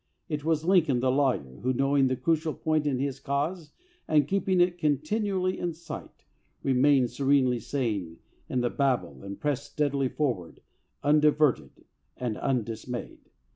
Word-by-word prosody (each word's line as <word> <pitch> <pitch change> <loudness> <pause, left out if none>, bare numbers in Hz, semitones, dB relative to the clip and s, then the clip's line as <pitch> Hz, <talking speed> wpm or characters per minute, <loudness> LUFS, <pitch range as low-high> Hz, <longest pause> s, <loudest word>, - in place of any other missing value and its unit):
It 150 -4 -3
was 160 0 0
Lincoln 165 -9 +3
the 130 +1 +2
lawyer 130 - 0
who, 130 +2 +1
knowing 135 +1 +3
the 130 - 0
crucial 155 +4 0
point 155 -1 0
in 135 -3 +1
his 135 0 -2
cause 150 +4 -2 0.4
and 150 -2 +3
keeping 190 0 +1
it 175 0 +2
continually 185 - 0
in 175 -1 -2
sight, 170 +2 -10 0.4
re 135 - +2
mained 130 -1 +4
serenely 135 -3 +2
sane 105 - -3 0.3
in 125 - 0
the 120 - 0
Babel 135 -3 0
and 100 0 -7
pressed 145 -1 -2
steadily 140 -3 0
forward, 120 - -3 0.4
undiverted 150 - +2 0.3
and 120 -4 -2
undismayed. 120 -1 -3
140 Hz, 145 wpm, -27 LUFS, 125-155 Hz, 0.4 s, mained